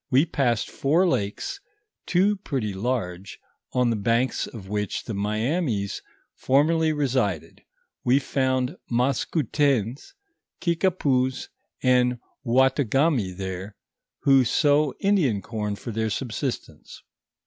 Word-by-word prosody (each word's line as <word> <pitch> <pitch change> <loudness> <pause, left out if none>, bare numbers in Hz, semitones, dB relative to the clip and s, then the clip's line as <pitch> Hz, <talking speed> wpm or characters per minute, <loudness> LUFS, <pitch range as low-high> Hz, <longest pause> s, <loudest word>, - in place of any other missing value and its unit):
We 135 +5 +4
passed 120 -8 0
four 165 +7 +2
lakes, 105 - -2 0.5
two 195 +4 +3
pretty 130 - -3
large, 95 -4 -3 0.3
on 125 -2 +2
the - - +1
banks 115 +5 0
of 105 -5 -10
which 105 0 -2
the 115 - -5
Miainis 110 - -1 0.3
formerly 155 +4 +2
resided, 130 - -1 0.4
we 125 +2 +4
found 130 -2 0
Maskoutens, 135 - 0 0.4
Kikupous, 150 -8 0 0.3
and 125 -1 +3 0.3
Outaougamy 130 - +2
there, 95 +1 -5 0.5
who 135 -1 +5
sow 145 +4 +2
Indian 175 - +2
corn 105 0 -4
for 115 - -7
their 110 0 -1
subsistence. 120 +3 -5
125 Hz, 105 wpm, -25 LUFS, 105-145 Hz, 0.5 s, who